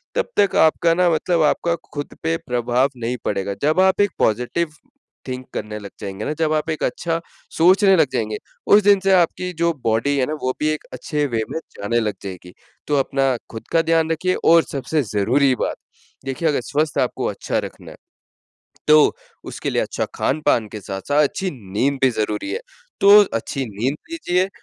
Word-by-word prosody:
तब - - 0
तक 200 - +3
आपका 165 +1 +2
ना 180 0 +3
मतलब 165 +1 +1
आपका 170 +3 +1 0.2
खुद 145 -1 -6
पे 165 0 +1
प्रभाव 125 +1 0
नहीं 120 +1 -3
पड़ेगा। 100 -1 -1
जब 155 +4 +2
आप 190 +1 +3
एक 205 -3 +2
पॉज़िटिव 125 +9 0 0.6
थिंक 130 0 -5
करने 105 0 -5
लग 100 -1 -9
जाएँगे 100 +2 -5
ना, 150 - -1
जब 155 0 0
आप 155 +1 -1
एक 155 - -2
अच्छा 165 -1 -1 0.4
सोचने 190 +3 +5
लग 155 -4 +4
जाएँगे, 110 -4 -1 0.3
उस 210 - +7
दिन 200 -1 +5
से 195 - +3
आपकी 180 0 +2
जो 170 0 +3
बॉडी 115 +6 +1
है 130 - +2
ना, 155 - -3
वो 130 - 0
भी 150 - 0
एक 155 - -2
अच्छे 150 -1 -2
वे 115 -4 -1
में 160 - -3 0.2
जाने 115 +4 0
लग 105 -3 -2
जाएगी। 90 -2 -8 0.4
तो 145 - +1
अपना 135 -1 +1 0.2
खुद 110 0 -9
का 165 -1 +4
ध्यान 165 0 +2
रखिये 185 +3 0
और 165 0 +6
सबसे 145 +3 -1
ज़रूरी 130 +7 +3
बात, - - -2 0.5
देखिए, 135 +5 -2
अगर 140 - 0
स्वास्थ्य 150 +4 0
आपको 125 - -2
अच्छा - - -2
रखना - - -8
है, - - -13 0.9
तो 150 0 +6 0.3
उसके - - -4
लिए - - +1
अच्छा - - -2
खान-पान 130 -6 +1
के 105 - -6
साथ-साथ 105 +10 0
अच्छी 190 +5 -1 0.2
नींद 135 +6 +1
भी 130 - +5
ज़रूरी 105 -2 -2
है। 470 - -3 0.4
तो 200 +1 +8 0.2
अच्छी 135 +4 -2
नींद 120 +7 -2
लीजिए, 190 - 0
145 Hz, 190 wpm, -21 LUFS, 120-165 Hz, 0.9 s, तो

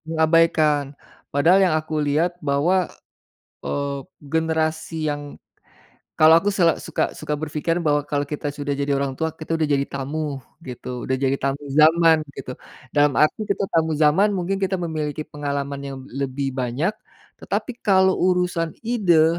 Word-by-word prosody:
Mengabaikan, 160 -3 +2 0.3
padahal 170 +7 +4
yang - - +1
aku 155 0 -2
lihat 150 +4 +1
bahwa, 160 +6 +1 0.8
eee, 140 -1 -2 0.2
generasi 160 +1 -1
yang 145 0 -6 0.8
kalau 155 +1 +8
aku 200 +4 0
sel 170 -4 +4
suka 165 - -2
suka 150 -1 -3
berpikiran 155 +2 -1
bahwa 145 -2 +2
kalau 145 -1 -1
kita 145 0 -4
sudah 145 0 -3
jadi 140 +1 -2
orang 135 -1 -1
tua, 160 0 0
kita 160 +1 -4
udah 155 - +1
jadi 140 -1 +1
tamu 140 +1 -4 0.3
gitu, 125 0 -6
udah 130 - 0
jadi 135 0 +1
tamu 140 +1 -2 0.2
zaman 160 0 +5
gitu. 130 -1 -7 0.4
Dalam 145 -1 +4
arti 155 +8 +2
kita 200 0 -1
tamu 160 -1 +1
zaman 155 +7 +4
mungkin 190 +1 -1
kita 190 0 +1
memiliki 155 -3 -3
pengalaman 140 -1 -4
yang 140 -1 -6
lebih 135 +1 -3
banyak, 130 +7 -1 0.5
tetapi 245 -2 -4
kalau 190 -1 +5
urusan 180 -2 +1
ide 175 -8 +3
155 Hz, 150 wpm, -22 LUFS, 140-165 Hz, 0.8 s, kalau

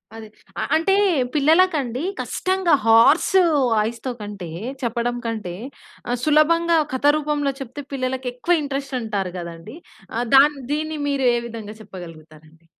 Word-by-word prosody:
అది. 225 -1 -9 0.3
అ - - -1
అంటే 330 +5 +2 0.4
పిల్లలకండి 300 -4 +2 0.2
కష్టంగా 375 -2 0
హార్స్ 230 +11 +5 0.4
వాయిస్‌తో 225 +4 -1
కంటే 205 -4 -7 0.3
చెప్పడం 240 0 -1
కంటే, 215 -6 -4 0.5
ఆహ్, 245 0 -1
సులభంగా 330 +3 +3 0.2
కథ 260 +2 -2
రూపంలో 295 -2 -1
చెప్తే 270 +2 -7
పిల్లలకి 255 -1 -2
ఎక్కువ 295 +8 +1
ఇంట్రెస్ట్ 275 -1 -4
అంటారు 200 -5 -3
కదండి. 170 - -9 0.4
ఆహ్, 240 +1 -1
దాన్ 290 +2 +6
దీన్ని 310 +1 -2
మీరు 280 -2 0
ఏ - - +1
విధంగా 220 -2 -8
చెప్పగలుగుతారండి? 165 -4 -13
255 Hz, 125 wpm, -22 LUFS, 215-295 Hz, 0.5 s, దాన్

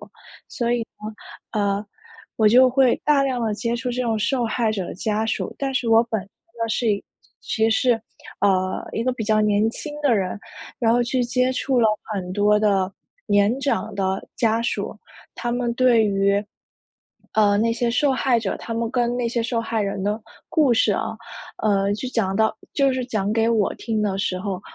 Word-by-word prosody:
呢， - - -13 1.4
呃， 205 -1 0 0.5
我 215 -1 +5
就 255 +3 +6
会 260 -1 +4
大 295 -2 +4
量 255 -3 -1
地 220 -2 0
接 235 +2 -2
触 250 +1 -3
这 250 +1 -2
种 225 -3 0
受 235 +2 0
害 225 0 0
者 195 -4 -3
的 - - -6
家 215 +2 -1
属。 225 - -2
但 270 -1 -2
是 240 -3 0
我 225 0 +6
本 220 -4 -2
身 195 - -15
呢， 230 +2 -7
是 225 +1 +1
一 200 - -2 0.4
其 220 0 +1
实 250 +3 +2
是， 225 -1 0 0.4
呃， 185 -2 +1
一 225 - -1
个 255 - +1
比 240 -3 -4
较 215 0 +3
年 210 +1 +2
轻 295 +5 -7
的 270 -6 +3
人， 190 0 -2 0.4
然 230 -2 +3
后 240 0 +3
去 250 +1 0
接 250 +2 +1
触 260 0 0
了 220 - +5 0.3
很 185 -2 -4
多 205 +2 +3
的 195 -3 +2 0.4
年 205 +5 +3
长 280 - -1
的 190 -1 -2
家 225 -1 +2
属， 235 - -3 0.4
他 240 - -3
们 240 -1 -1
对 240 -3 +4
于， 200 0 +2 0.9
呃， 205 -2 +4
那 230 +2 +2
些 235 +1 0
受 280 +3 +2
害 255 -2 +2
者 210 -4 -3
他 230 - -6
们 230 0 -1
跟 240 -1 0
那 245 -1 0
些 235 0 -1
受 235 -1 -1
害 225 -1 -1
人 200 -1 -2
的 210 +2 -1 0.3
故 290 -6 +3
事 220 -2 +3
啊， 220 - -3 0.5
呃， 200 -1 +2
就 215 +5 -4
讲 195 -6 0
到 220 +1 +2 0.2
就 275 -1 +3
是 255 -1 -2
讲 210 -4 -1
给 225 0 +2
我 220 -4 +1
听 220 -2 -2
的 195 -2 0
时 185 -2 -1
候， 200 +1 -3
我 185 - -7
225 Hz, 215 characters per minute, -22 LUFS, 205-245 Hz, 1.4 s, 就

